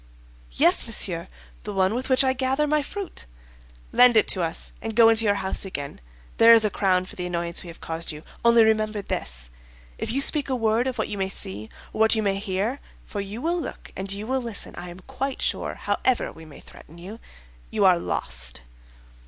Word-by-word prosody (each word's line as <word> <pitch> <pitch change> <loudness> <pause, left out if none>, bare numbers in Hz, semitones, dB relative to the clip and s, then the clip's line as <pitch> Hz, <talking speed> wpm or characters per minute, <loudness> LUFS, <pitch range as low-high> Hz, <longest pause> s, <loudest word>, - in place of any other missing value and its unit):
'Yes, - - +4
monsieur, - - 0 0.3
the 210 - -6
one 190 +1 +2
with 255 +3 -3
which 260 +1 +5
I 260 -1 +2
gather 265 +3 0
my 300 0 +1
fruit.' 385 - -7 0.6
'Lend 245 -2 +6
it 215 - +4
to 185 - +3
us, 165 0 -2
and 225 -1 -5
go 230 -1 +7
into 225 0 +4
your 205 -1 +3
house 190 -1 -1
again; 145 - -6 0.4
there 230 +1 +8
is 225 -1 +6
a 210 - +1
crown 185 -2 +1
for 210 - -10
the 180 -3 -3
annoyance 170 -1 -1
we - - -11
have 170 - -11
caused 165 +1 -2
you. 150 0 -9 0.2
Only 235 -1 +6
remember 215 -1 +1
this—if - - -5
you 260 - 0
speak 285 0 +2
a 260 - +1
word 225 +1 +1
of 255 - -3
what - - -1
you 205 - -4
may 190 0 -1
see 105 - -5 0.2
or - - -6
what 220 +1 +5
you 220 - 0
may 195 -1 0
hear 205 +6 -2 0.3
(for 205 - -5
you 205 +5 -7
will 340 +2 0
look - - -8
and 195 0 -4
you 200 +2 -3
will 260 +2 -1
listen, 230 -4 -6
I 175 0 -7
am 175 +2 -11
quite 270 +7 -4
sure, - - -2
however 255 -2 0
we 160 - -13
may 155 - -13
threaten 165 - -15
you), 195 +6 -10 0.5
you 195 - +1
are 180 -2 +5
lost. 60 - -2
205 Hz, 210 wpm, -24 LUFS, 175-235 Hz, 0.6 s, there